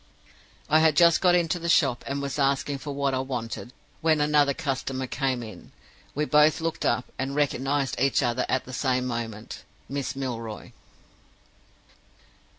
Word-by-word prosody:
"I 155 - +4
had 160 -2 +4
just 170 -2 +6
got 180 -1 +5
into 175 -1 +1
the 170 0 -3
shop, 135 -6 +3
and 140 +1 -3
was 140 +1 -3
asking 140 0 +1
for 145 - -6
what 140 -1 -1
I 130 - 0
wanted, 125 -2 -5 0.3
when 160 -1 +3
another 150 -1 +3
customer 130 -1 -3
came 130 -1 -2
in. 110 -6 -11 0.4
We 150 +2 0
both 150 +1 +4
looked 165 0 -2
up, 120 +1 -1
and 135 +1 -2
recognized 140 -1 0
each 135 +1 +3
other 120 0 0
at 130 - 0
the 130 - -9
same 125 0 0
moment: 115 -3 -5 0.3
Miss 135 -1 -3
Milroy. 115 -5 -5
135 Hz, 155 wpm, -26 LUFS, 125-150 Hz, 0.4 s, just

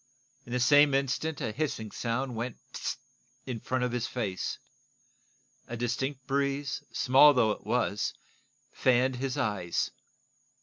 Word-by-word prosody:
In - - -9
the 125 - 0
same 145 +2 +6
instant 140 +3 -1
a - - -1
hissing 110 -5 -3
sound 120 +2 -2
went 115 +2 -4 0.2
pseu! - - -3 0.5
in 125 -4 -4
front 130 +3 -1
of 125 - 0
his 120 0 -1
face. 105 -8 -3 1.1
A 120 - -5
distinct 130 +3 -2
breeze, 140 0 -1
small 135 +3 +6
though 115 -4 +4
it - - -6
was, 120 -4 0 0.6
fanned 130 0 +2
his 130 0 -2
eyes. 95 -5 -1
125 Hz, 135 wpm, -29 LUFS, 115-135 Hz, 1.1 s, same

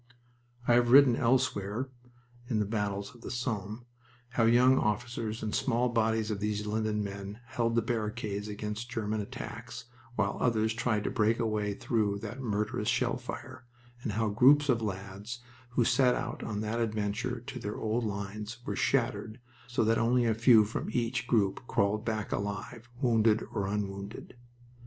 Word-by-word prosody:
I 120 - +5
have 120 0 +4
written 135 -1 +8
elsewhere 120 -1 +1 0.6
(in 115 - +1
The 105 - +2
Battles 100 -1 -2
of 120 - -17
the - - -7
Somme) 115 -2 -3 0.4
how 120 -2 +2
young 125 +3 +5
officers 110 0 -2
and 105 - -2
small 125 -1 +1
bodies 110 -1 +1
of 105 - -2
these 105 0 -1
London 105 0 0
men 100 +1 -6
held 115 -2 -1
the 115 - +3
barricades 105 -3 -2
against 105 +2 -5
German 110 -3 -2
attacks 100 - -7 0.3
while 105 -3 0
others 110 -2 +2
tried 110 -2 0
to - - -1
break 115 -1 +2
a 115 - 0
way 105 -2 0
back - - -18
through 105 -4 +1
that 120 +6 -6
murderous 105 -1 -1
shell 120 0 +2
fire, 130 +1 -8 0.4
and 110 - -3
how 110 +1 +1
groups 140 +7 +5
of 120 -3 +3
lads 100 +3 -5 0.3
who 120 -1 +1
set 125 0 +4
out 120 - -4
on 105 -1 -3
that 110 +2 -2
adventure 110 +2 -1
to 125 +1 -7
their 105 -2 -4
old 110 +2 -1
lines 105 +2 -4
were - - -2
shattered 115 -3 0 0.3
so 120 -1 +1
that 115 +1 +3
only 120 +1 +3
a 115 - +3
few 115 -1 +6
from 105 - -4
each 120 0 -1
group 105 -6 +2
crawled 100 +2 +1
back 110 -3 -2
alive, 110 +4 -4
wounded 115 -2 +4
or 100 -3 -1
unwounded. 100 +2 -4
110 Hz, 170 wpm, -30 LUFS, 105-120 Hz, 0.6 s, written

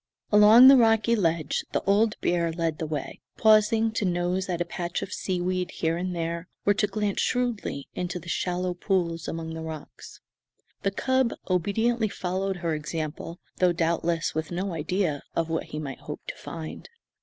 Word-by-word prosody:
Along 215 +4 +9
the 270 0 +9
rocky 225 -1 +4
ledge 165 -7 0
the - - 0
old 210 +2 +2
bear 170 -1 +1
led 165 -2 -2
the 160 - -2
way, 150 -1 -5 0.2
pausing 220 +1 +4
to 220 - -2
nose 180 +1 0
at 175 -2 -1
a 175 - 0
patch 175 0 -4
of 195 - -6
seaweed 180 0 -1
here 165 0 -1
and 180 +1 -3
there 170 +1 -3 0.2
or 205 - +5
to 210 +1 +1
glance 205 0 -1
shrewdly 235 - -1
into 180 0 -3
the 175 0 -10
shallow 180 +1 -1
pools 175 -3 -1
among 165 0 -4
the 160 - -6
rocks. 160 -2 -9 0.6
The 195 - +1
cub 260 +4 +1
obediently 215 +5 +1
followed 190 +1 -2
her 165 - +1
example, 155 +2 -4 0.2
though 180 -1 +3
doubtless 170 0 0
with 160 0 -3
no 185 +2 -3
idea 165 -1 -1
of 165 -1 0
what 165 0 -1
he - - -7
might 140 -4 -5
hope - - -7
to - - -5
find. 160 -2 -8
180 Hz, 175 wpm, -26 LUFS, 165-205 Hz, 0.6 s, Along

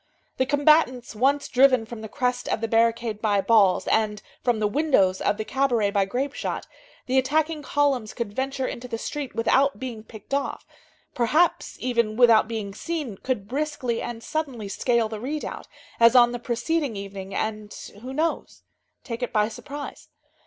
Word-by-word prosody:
The 260 - +1
combatants 290 -4 +3
once 275 +5 +2
driven 255 -3 +4
from 230 -1 -8
the 220 - -7
crest 250 +1 -1
of - - 0
the 225 - -2
barricade 230 -1 +1
by 205 -2 +2
balls, 200 -3 +4
and 215 -1 +1 0.2
from 240 -3 +2
the 215 - 0
windows 210 -7 +2
of 205 - +1
the 215 - -3
cabaret 245 -7 +1
by 200 -1 +2
grape 260 +8 -2
shot, - - -4 0.4
the 260 0 +3
attacking 305 +4 0
columns 275 -7 0
could 230 -4 -4
venture 265 +2 -2
into 250 0 -5
the 230 -2 -4
street 285 +3 -5
without 270 +5 +2
being 240 -4 -6
picked 220 +4 -11
off, 280 0 -2 0.5
perhaps, 300 +9 +1
even, 235 -3 0
without 235 -3 +6
being 215 -3 -4
seen, 290 - -4
could 215 -5 -3
briskly 270 -2 -2
and 230 -1 -6
suddenly 270 -9 -3
scale 235 +2 +1
the 215 -1 -6
redoubt, 290 +6 -5 0.3
as 230 +2 +6
on 240 -1 +7
the 245 - -4
preceding 255 +3 -1
evening, 195 -1 -7
and, 215 -1 -3 0.3
who 255 +2 -7
knows? 315 +4 -2 0.4
take 230 0 -6
it 245 - -2
by 210 -1 +2
surprise. 285 +5 -8
240 Hz, 170 wpm, -25 LUFS, 220-275 Hz, 0.5 s, on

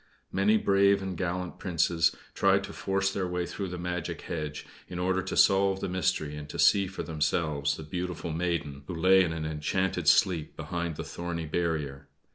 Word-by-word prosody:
Many 105 +3 +3
brave 100 -1 +4
and 95 -1 -4
gallant 90 0 -3
Princes 85 -2 +2 0.2
tried - - +3
to - - -7
force 95 0 0
their 95 -2 -1
way 90 0 -2
through 100 +2 -4
the 90 0 -5
magic 90 -1 -4
hedge, 75 -2 -5 0.2
in 90 - -7
order 95 +1 +1
to - - -4
solve 95 0 +4
the - - -2
mystery 85 -5 -1
and 75 0 -8
to - - -6
see 100 -1 +5
for 95 - -5
themselves 75 -2 0
the 80 - -7
beautiful 90 +1 -4
maiden 80 -4 -2
who 90 - -4
lay 95 +3 +5
in 85 - -1
an 80 -1 -3
enchanted 80 +5 -1
sleep 85 -5 +3
behind 85 -2 -3
that - - -5
thorny 85 -1 -4
barrier. 75 -4 -2
85 Hz, 185 wpm, -29 LUFS, 80-95 Hz, 0.2 s, see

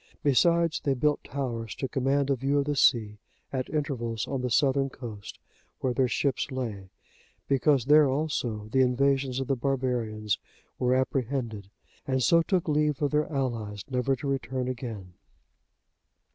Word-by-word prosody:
Besides, 170 +3 +3
they 140 -2 +1
built 150 +3 +1
towers 120 -5 -4
to 135 - -3
command 135 +2 +1
a - - +3
view 135 +3 0
of 140 - +2
the 145 0 -1
sea, 110 -5 +3 0.3
at 130 -1 -2
intervals, 120 -7 -2
on 135 -1 -2
the 125 - -1
southern 135 +2 +2
coast, 110 -6 -9 0.4
where 130 - 0
their 130 +1 +2
ships 135 +2 0
lay, 110 -8 -4 0.6
because 135 -1 +3
there 150 0 +6
also 130 -7 -2
the 130 - +3
invasions 135 +1 +2
of 135 - -2
the 135 - 0
barbarians 120 -5 -1 0.4
were 125 0 +2
apprehended, 125 -6 -2 0.4
and 130 -1 +1
so 170 +6 +5
took 180 0 0
leave 150 -1 +1
of 145 -2 0
their 150 +1 +1
allies, 115 -7 -3
never 130 +1 +1
to 140 - -9
return 130 -1 -2
again. 115 -8 -6
130 Hz, 155 wpm, -28 LUFS, 120-140 Hz, 0.6 s, there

